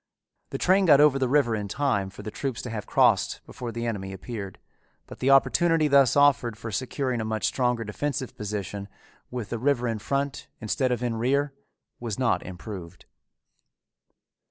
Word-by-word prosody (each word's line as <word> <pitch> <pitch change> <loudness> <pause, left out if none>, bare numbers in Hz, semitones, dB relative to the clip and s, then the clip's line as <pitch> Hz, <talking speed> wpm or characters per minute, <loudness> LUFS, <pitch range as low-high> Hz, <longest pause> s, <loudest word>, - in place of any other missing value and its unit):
The - - -3
train 190 +2 +3
got 145 -3 +7
over 145 -2 +5
the 130 - +1
river 130 -5 +3
in 105 -1 -3
time 100 -5 0
for - - -11
the 105 - -5
troops 135 -1 -4
to 125 - -5
have 105 -3 -5
crossed - - +3
before 120 -2 -6
the 115 +1 -4
enemy 95 -4 -3
appeared, 100 -1 -7 0.5
but - - -11
the 130 - +1
opportunity 155 +4 +4
thus 140 -4 +5
offered 140 -6 +3
for 115 0 -6
securing 130 +3 -2
a - - -2
much 110 0 -2
stronger 125 -3 +1
defensive 130 +5 -3
position, 100 -1 -4 0.4
with 120 -5 -5
the 120 - -2
river 125 -1 +1
in 115 -2 -2
front 140 +4 -2
instead 125 +4 0
of 125 0 -1
in 120 -2 -1
rear, 140 +4 +1 0.5
was 115 -4 -4
not 130 -3 +1
improved. 90 -2 -9
120 Hz, 175 wpm, -26 LUFS, 105-135 Hz, 0.5 s, got